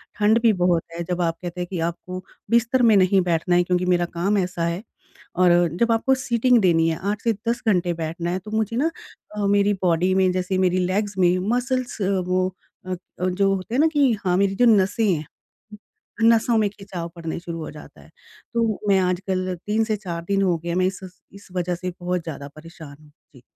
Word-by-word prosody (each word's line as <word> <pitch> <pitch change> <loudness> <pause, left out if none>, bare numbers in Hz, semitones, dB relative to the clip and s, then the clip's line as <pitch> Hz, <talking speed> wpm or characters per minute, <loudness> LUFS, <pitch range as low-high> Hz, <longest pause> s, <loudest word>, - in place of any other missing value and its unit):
ठंड 210 +2 +3
भी 230 -2 +4
बहुत 175 -3 +1
है। 170 - -3
जब 180 0 -1
आप 165 -1 0
कहते 180 0 -6
हैं 175 - -3
कि 180 - -3
आपको, 180 +2 -4 0.3
बिस्तर 235 +2 +2
में 225 -3 +6
नहीं 190 0 +4
बैठना 175 0 +1
है, 175 - +4
क्योंकि 180 0 0
मेरा 175 -1 +2
काम 185 +5 -1
ऐसा 180 -2 -1
है 170 +4 -3 0.5
और 180 0 +4 0.3
जब 235 0 +3
आपको 230 +4 +2
सीटिंग 245 -1 +2
देनी 165 -3 +3
है 160 - -2
8 210 - -4
से 230 - +2 0.2
10 235 - -1
घंटे 180 -4 +2
बैठना 165 +1 -4
है, 185 - -1
तो 210 +3 -11
मुझे 220 0 -1
ना 315 +6 +1 0.5
अ, 205 - 0
मेरी 200 0 +3
बॉडी 180 +1 +2
में, 190 -1 +3
जैसे 185 +1 -1
मेरी 185 -1 +2
लेग्स 200 +2 -2
में 180 -1 +3 0.2
मसल्स 255 -2 -2
अ, 190 - +1 0.2
वो 185 0 +1 0.4
अ - - -4 0.3
अ, 180 +1 0
जो 195 +2 +1
होते 190 +5 -5
हैं - - +2
ना 320 - +5
कि 280 -4 +4
हाँ, 180 0 +2
मेरी 195 0 +1
जो 245 - +3
नसें 215 0 +3
हैं। 155 -2 -3 1.0
नसों 230 +1 +4
में 215 -2 +2
खिंचाव 195 -4 -7
पड़ने 165 -1 -5
शुरू 170 -1 -6
हो 155 - -6
जाता 150 0 -13
है। - - -18 0.4
तो 230 -3 0
मैं 195 -1 +5
आजकल 185 0 -1
3 215 +2 +2
से 215 -1 0
4 175 -4 -5
दिन 195 0 +1
हो 180 -3 +2
गए 170 +2 -7
हैं, 170 - -1
मैं 185 0 +2
इस 190 0 -2 0.3
इस, 200 +1 -15
वज़ह 180 -1 -2
से 180 +1 -5
बहुत 180 -1 -2
ज़्यादा 145 -3 -7
परेशान 160 -2 -11
हूँ। 150 - -20 0.2
जी। 125 - -16
185 Hz, 220 wpm, -23 LUFS, 175-210 Hz, 1.0 s, में